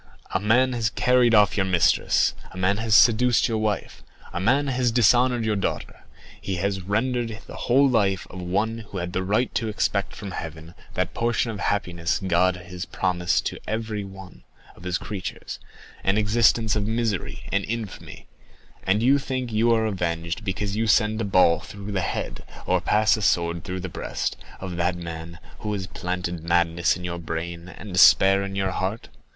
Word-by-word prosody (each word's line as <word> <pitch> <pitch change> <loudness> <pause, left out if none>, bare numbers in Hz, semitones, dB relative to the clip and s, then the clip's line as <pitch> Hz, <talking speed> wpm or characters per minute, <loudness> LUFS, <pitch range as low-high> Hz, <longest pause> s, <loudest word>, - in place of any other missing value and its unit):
A - - +2
man 120 +6 +3
has 115 -2 0
carried 125 0 +3
off 105 -3 +5
your 95 - +1
mistress, 90 -2 +3 0.2
a 95 - -12
man 95 +2 +1
has 110 0 +2
seduced 120 +2 +5
your 115 -2 -1
wife, 110 -2 -2 0.3
a - - -2
man 130 +10 +2
has 125 -3 +1
dishonored 120 +1 +3
your 110 -1 +1
daughter; 100 - -4 0.4
he 95 - -3
has 95 +1 -1
rendered 115 +3 -1
the - - -10
whole 135 +3 +5
life 100 -7 +1
of 90 - -7
one 105 +6 -1
who 100 - -6
had 90 0 -4
the 95 - 0
right 105 +6 0
to 115 - -1
expect 100 -2 -1
from 100 -2 -7
Heaven 80 -1 -7 0.2
that - - -1
portion 115 0 0
of 105 - -7
happiness 90 -4 -1
God 90 0 +3
has 90 0 -7
promised 90 -1 0
to - - -3
everyone 105 -4 -5 0.3
of 90 - -14
his 90 0 0
creatures, 100 -4 -6 0.4
an 95 +2 +2
existence 110 +1 +3
of 105 -1 -1
misery 110 -4 -2
and 100 0 +1
infamy; 115 -3 -6 0.6
and 100 +4 +1
you 135 +3 +5
think 130 -3 -4
you 115 +2 +3
are 110 -1 +2
avenged 85 -1 -2
because 100 0 -2
you 110 +1 0
send 110 +1 +3
a - - 0
ball 95 -4 +4
through 100 0 -9
the 95 -2 0
head, - - -4 0.2
or - - +1
pass 105 +1 +3
a - - -5
sword 85 -4 +1
through 90 0 -5
the 95 - -4
breast, 85 - -3 0.2
of 90 -2 -6
that 90 +1 +1
man 85 -1 -7 0.2
who 105 - -4
has 95 -2 -3
planted 90 -2 -4
madness 85 0 +2
in 90 - -9
your 85 -1 -4
brain, 85 +1 -5
and 95 +1 -10
despair 95 +2 +6
in 100 0 -5
your 95 -1 0
heart. 95 +5 -3
100 Hz, 180 wpm, -24 LUFS, 90-110 Hz, 0.6 s, despair